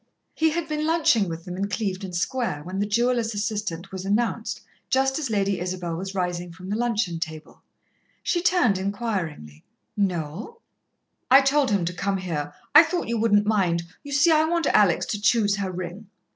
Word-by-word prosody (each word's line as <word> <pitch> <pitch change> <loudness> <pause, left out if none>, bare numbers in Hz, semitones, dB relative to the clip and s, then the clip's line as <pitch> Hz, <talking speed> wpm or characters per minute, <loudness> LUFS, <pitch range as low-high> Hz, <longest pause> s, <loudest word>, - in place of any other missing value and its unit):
He 320 0 +2
had 325 +1 -2
been 305 0 -2
lunching 320 - +3
with 165 0 -6
them 180 - -6
in 200 +2 -2
Clevedon 190 -2 -3
Square, 180 - -2
when 185 +4 -5
the 205 - 0
jeweller's 235 0 +1
assistant 205 -4 -3
was 190 -1 -5
announced, 210 +4 -1 0.3
just 270 +2 +2
as 285 -6 -3
Lady 200 -2 0
Isabel 180 -1 -3
was 190 +3 -5
rising 180 -1 -2
from 185 +3 -9
the - - 0
luncheon 220 -7 -1
table. 160 -2 -7 0.6
She 345 - 0
turned 345 - +3
enquiringly. 190 - -4 0.3
"Noel?" 195 - -2 0.7
"I 265 +2 +8
told 275 0 +2
him 200 -4 +1
to 175 - -2
come 195 +2 -1
here. 155 -6 -3 0.2
I 300 - +11
thought 335 -4 -2
you 235 -1 0
wouldn't 205 -2 +3
mind. 185 -6 +1 0.2
You 285 - -10
see, 285 +4 +4
I 310 0 +5
want 335 0 0
Alex 200 -5 +4
to 210 - -3
choose 210 -2 +3
her 195 -2 -2
ring." 185 +3 -7
205 Hz, 180 wpm, -24 LUFS, 180-245 Hz, 0.7 s, I